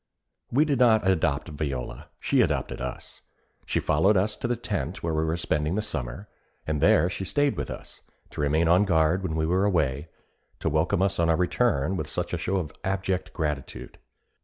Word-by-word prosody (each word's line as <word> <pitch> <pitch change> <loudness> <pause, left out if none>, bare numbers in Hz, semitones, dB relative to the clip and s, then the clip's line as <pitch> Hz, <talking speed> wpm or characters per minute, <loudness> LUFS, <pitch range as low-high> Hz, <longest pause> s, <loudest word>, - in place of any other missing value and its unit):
We 145 +6 +3
did 140 -5 0
not 110 -5 +4
adopt 80 -4 +1
Viola; 70 -5 -4
she - - +2
adopted - - -1
us. 65 0 -7 0.5
She - - +1
followed 95 +7 +3
us 105 +3 +1
to - - -3
the 120 - 0
tent 95 - -4
where 85 -1 -1
we 80 0 +1
were 80 +1 -1
spending 75 0 0
the 105 - +1
summer, 65 +5 -5 0.4
and 75 -2 -2
there 75 - +5
she 90 - -4
stayed 145 +8 +1
with - - -4
us, - - -9 0.3
to - - -5
remain 80 +3 +2
on 90 +4 +5
guard 80 0 +2
when 90 -4 -3
we 80 0 0
were 90 +4 +2
away, 75 -7 +1 0.5
to - - 0
welcome 85 +5 +1
us 95 -1 +1
on 85 0 +3
our 80 - +4
return 90 - +1
with 80 - -3
such - - -3
a - - -1
show 95 - -1
of 80 -5 -3
abject 95 -1 -1
gratitude. 75 -4 -4
85 Hz, 195 wpm, -26 LUFS, 75-95 Hz, 0.5 s, there